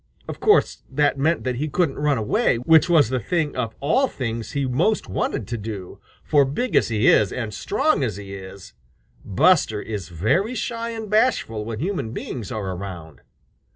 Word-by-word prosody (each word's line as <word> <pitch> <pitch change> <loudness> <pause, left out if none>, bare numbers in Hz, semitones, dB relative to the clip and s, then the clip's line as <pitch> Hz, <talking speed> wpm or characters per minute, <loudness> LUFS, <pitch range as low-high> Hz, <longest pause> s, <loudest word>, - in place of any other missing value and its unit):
Of - - -6
course, 425 0 +3
that 145 -2 +1
meant 160 +5 +1
that 125 -1 -2
he 150 +4 -2
couldn't 150 -3 0
run 145 -2 +2
away, 120 - +1
which 160 +8 +4
was 155 -8 +5
the 130 0 0
thing 155 - -1
of 115 -3 -3
all 255 - +2
things 115 - -5
he 140 -2 0
most 130 - +1
wanted 95 +2 -2
to 120 -2 -3
do, 100 -4 -7 0.2
for 145 -2 +4
big 145 - -2
as - - +4
he 110 -2 0
is 105 -3 +5
and 115 -4 -4
strong - - 0
as - - -2
he 100 -1 -8
is, 95 0 -10 0.5
Buster 110 - +3
is 105 -6 -6
very 140 - 0
shy 230 0 -3
and 225 -2 -6
bashful 210 - +1
when 115 -1 -4
human 140 - -3
beings 120 -4 -6
are 100 -4 -3
around. 90 -4 -8
125 Hz, 185 wpm, -22 LUFS, 105-165 Hz, 0.5 s, was